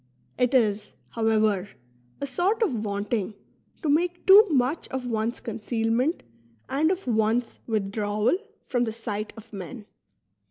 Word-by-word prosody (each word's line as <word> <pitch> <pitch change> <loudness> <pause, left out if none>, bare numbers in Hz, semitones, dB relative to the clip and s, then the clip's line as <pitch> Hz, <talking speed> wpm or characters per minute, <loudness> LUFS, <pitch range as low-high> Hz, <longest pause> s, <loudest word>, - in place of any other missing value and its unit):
It 250 +1 +2
is, 210 -4 +2 0.2
however, 215 -3 +1 0.5
a - - -2
sort 365 - +1
of 415 - +2
vaunt 210 -2 -3
ing 210 -2 -1 0.5
to - - 0
make 350 +4 +1
too 410 +3 +9
much 275 +1 +1
of 260 -1 -4
one's 230 0 -1
concealment 230 +5 -1 0.4
and 305 +4 +2
of 375 +1 -1
one's 225 0 +1
withdrawal 210 - 0 0.3
from 245 -2 +1
the 220 - -2
sight 215 -2 -4
of 225 0 -13
men. 205 +3 -7
230 Hz, 135 wpm, -26 LUFS, 215-265 Hz, 0.5 s, too